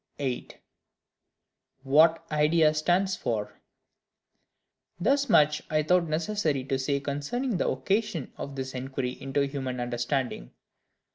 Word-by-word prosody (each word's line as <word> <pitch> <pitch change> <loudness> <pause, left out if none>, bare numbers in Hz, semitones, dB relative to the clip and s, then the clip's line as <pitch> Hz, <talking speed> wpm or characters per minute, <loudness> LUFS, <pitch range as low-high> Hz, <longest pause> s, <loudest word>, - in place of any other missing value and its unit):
8. 130 -4 -4 1.3
What 160 +4 +4
Idea 155 +1 +4
stands 180 +5 +1
for. 110 -4 -3 1.4
Thus 275 +9 +2
much 150 0 +4
I 155 0 +1
thought 180 +2 +3
necessary 160 -3 -1
to 135 0 -1
say 140 +1 0
concerning 145 - -2
the - - +1
occasion 195 - -1
of 140 - -7
this 130 -1 -5
inquiry 130 0 -3
into 135 +1 0
human 135 -3 -4
Understanding. 120 - -2
145 Hz, 115 wpm, -27 LUFS, 130-170 Hz, 1.4 s, What